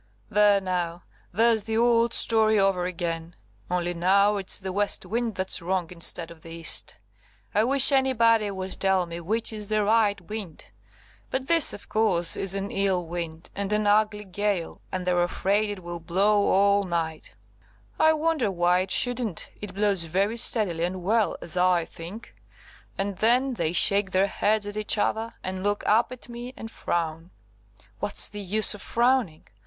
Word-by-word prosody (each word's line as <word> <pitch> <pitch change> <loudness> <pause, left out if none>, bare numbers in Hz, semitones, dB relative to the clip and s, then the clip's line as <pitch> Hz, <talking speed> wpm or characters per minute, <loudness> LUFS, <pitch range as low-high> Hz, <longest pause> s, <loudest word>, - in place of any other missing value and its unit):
"There, 205 -1 +4
now! 175 -2 -3 0.3
There's 220 +1 +3
the 220 0 -2
old 235 0 +3
story 220 -1 +3
over 195 -3 +1
again, 170 -1 -5 0.3
only 175 0 -1
now 200 +4 +2
it's 195 -2 +1
the 190 -1 -5
west 205 +2 0
wind 230 -1 -3
that's 190 0 -1
wrong 180 -1 -2
instead 170 -1 +2
of 165 -1 -14
the 165 - -13
east! 165 0 +1 0.6
I 215 +2 +2
wish 275 +2 +5
anybody 230 -5 +2
would 190 -1 -5
tell 190 -2 +1
me 170 0 -7
which 220 +6 -1
is 210 -1 -3
the 215 0 0
right 210 -1 +2
wind! 195 -2 -9 0.6
But 265 0 -3
this, 330 -3 +5
of 205 - -9
course, 185 -6 +1
is 195 0 0
an 195 +1 -4
ill 190 -3 0
wind, 165 -1 -7
and 200 0 -3
an 210 0 +1
ugly 210 0 +2
gale, 200 -2 -3
and 185 -1 -4
they're 180 -1 +1
afraid 200 +4 0
it 200 -3 -7
will 175 0 -6
blow 200 +5 +1
all 200 +1 +3
night, 165 -4 -4 0.6
(I 315 0 +5
wonder 310 -7 0
why 175 -1 +1
it 185 +1 -3
shouldn't, 240 -4 0
it 205 -2 -8
blows 200 -4 +1
very 195 +7 -1
steadily 200 -8 +3
and 180 +1 -3
well, 220 +3 +1
as 165 - -4
I 180 -2 +2
think,) 180 +10 -11 0.6
and 195 -1 -3
then 250 +5 +2
they 165 -8 -2
shake 200 +2 +3
their 190 +1 +2
heads 205 +1 0
at 205 +1 -6
each 215 +1 0
other, 225 +2 -2
and 185 0 -5
look 205 +1 -1
up 225 +4 +2
at 255 - -10
me 240 +1 -9
and 225 - -8
frown. 165 0 -4 0.7
What's 205 0 +2
the 205 - -7
use 210 +3 +3
of 210 - -10
frowning? 235 -9 0
200 Hz, 175 wpm, -25 LUFS, 180-220 Hz, 0.7 s, wish